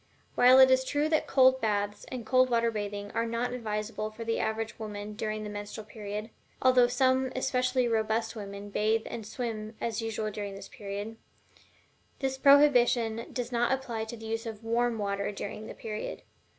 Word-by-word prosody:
While 250 +1 +7
it 260 0 +8
is 260 0 +4
true 290 +3 0
that 310 -1 +1
cold 260 -1 +5
baths, 205 -2 -1
or 255 - -3
cold 255 +3 +3
water 235 -1 +2
bathing, 205 -1 -4
are 230 0 -1
not 235 +2 -2
advisable 215 -2 -3
for 215 +2 -8
the 225 0 -1
average 220 +1 -2
woman 210 -1 -6
during 215 0 -3
the 210 - -5
menstrual 205 +1 -6
period 210 0 -6 0.3
(although 255 -1 +5
some 260 +1 +2
especially 255 -1 +1
robust 225 0 0
women 200 -1 -7
bathe 220 +2 +1
and 220 -3 -6
swim 220 -2 -5
as 230 -1 -2
usual 220 -1 -3
during 200 -1 -5
this 195 - -10
period), 205 0 -6 1.0
this 265 -1 -2
prohibition 245 -5 +5
does 245 -1 -4
not 240 0 +1
apply 240 -4 -2
to 235 +1 -7
the 225 - -10
use 225 +1 -3
of 220 -1 -7
WARM 235 +1 +1
water 200 -1 -2
during 205 +2 -6
the - - -8
period. 215 -1 -6
225 Hz, 175 wpm, -29 LUFS, 215-250 Hz, 1.0 s, it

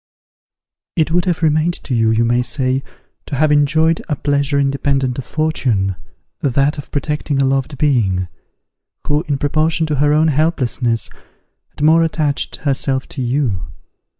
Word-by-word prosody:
"It 160 -2 +1
would 175 +1 +2
have 175 -2 -1
remained 155 +2 +2
to 130 - -4
you, 115 -2 +2
you 110 +1 +2
may 120 +1 +2
say, 130 +1 0 0.5
to 145 - -3
have 150 +2 +2
enjoyed 155 +3 +3
a 150 - +1
pleasure 145 0 0
independent 135 -2 0
of 135 - -6
fortune, 120 -11 0 0.4
that 140 +2 +1
of 145 - -9
protecting 150 -1 -2
a 135 - +3
loved 135 +1 -1
being, 105 -11 +1 0.8
who, 145 +1 +1
in 145 -2 0
proportion 155 +3 +1
to 150 -2 -1
her 145 +1 +3
own 155 +2 +3
helplessness, 130 - 0 0.6
had - - -7
more 160 +2 +5
attached 155 -3 -1
herself 135 -2 -1
to 140 - -5
you. 120 -7 0
140 Hz, 150 wpm, -18 LUFS, 130-155 Hz, 0.8 s, more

